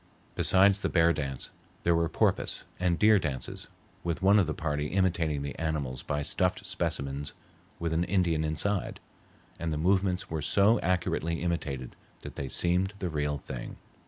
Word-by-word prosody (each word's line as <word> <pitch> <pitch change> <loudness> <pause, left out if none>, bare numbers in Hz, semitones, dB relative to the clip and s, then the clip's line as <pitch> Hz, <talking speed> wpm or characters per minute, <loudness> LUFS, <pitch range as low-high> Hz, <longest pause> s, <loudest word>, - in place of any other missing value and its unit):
Besides 100 +1 +5
the - - -1
bear 85 -1 +4
dance, 70 -4 -4 0.3
there 85 - +3
were 85 -1 +1
porpoise - - 0 0.2
and 90 -1 +1
deer 105 -1 +5
dances 70 -7 -3 0.4
with 85 +1 -2
one 100 +2 +6
of 95 - +2
the 80 - -1
party 75 -1 -2
imitating 85 -5 0
the 70 - -4
animals 75 -6 -2
by 75 0 -2
stuffed - - +1
specimens 70 +1 -2 0.4
with 85 -1 -2
an 85 +2 +1
Indian 85 -4 +1
inside, 90 +6 -1 0.6
and 85 -1 -2
the 75 - -1
movements 95 +2 +1
were 80 -1 -3
so 100 +10 +4
accurately 85 -2 -1
imitated 70 -7 -3 0.3
that - - -8
they 70 - -4
seemed 90 +8 +1
the 90 -3 -3
real 75 -2 -1
thing. 65 -2 -7
85 Hz, 160 wpm, -29 LUFS, 75-90 Hz, 0.6 s, one